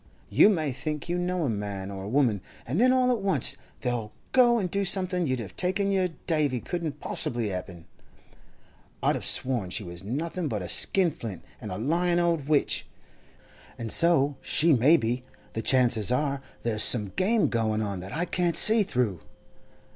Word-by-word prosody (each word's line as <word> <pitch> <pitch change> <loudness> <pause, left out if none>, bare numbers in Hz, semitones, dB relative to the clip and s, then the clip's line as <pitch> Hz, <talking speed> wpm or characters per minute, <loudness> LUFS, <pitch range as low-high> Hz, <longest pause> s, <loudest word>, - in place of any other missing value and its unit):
You - - +6
may 160 -8 0
think 150 +5 -5
you 175 +1 0
know 180 -1 -1
a 140 - 0
man 100 -2 -5
or 95 -1 -7
a - - -5
woman, 120 -6 +2 0.2
and 150 - -1
then 255 +1 +5
all 255 -1 +3
at 235 -4 -1
once 195 -1 0 0.3
they'll 120 -4 -2 0.2
go 240 -2 +5
and 195 -5 -1
do 200 0 0
something 185 -2 +1
you'd 130 -1 -1
have 105 -4 -8
taken 190 +2 0
your 190 -2 +2 0.2
davy 150 -7 0
couldn't 160 0 -4
possibly 120 -3 -2
happen. 90 -3 -7 1.2
I'd - - +3
have - - -4
sworn 120 -8 0
she 105 - -3
was 85 0 -9
nothing 160 - -3
but 105 -8 -3
a - - -5
skinflint 155 - -1 0.2
and - - -6
a 90 - -4
lying 170 - +1
old 170 -5 0
witch. 150 -2 +1 0.9
And 115 -2 -5
so 145 -5 +3
she 165 +1 +3
may 140 +7 +5
be; 120 -1 -2 0.3
the 110 - -3
chances 120 -4 +2
are 140 +1 0 0.2
there's 110 -2 0
some 105 -4 +5
game 200 - +1
going 110 -2 0
on 100 -3 -4
that 95 +2 -9
I 165 +3 -1
can't 175 -2 0
see 220 +1 +5
through. 125 - -1
140 Hz, 180 wpm, -27 LUFS, 110-180 Hz, 1.2 s, You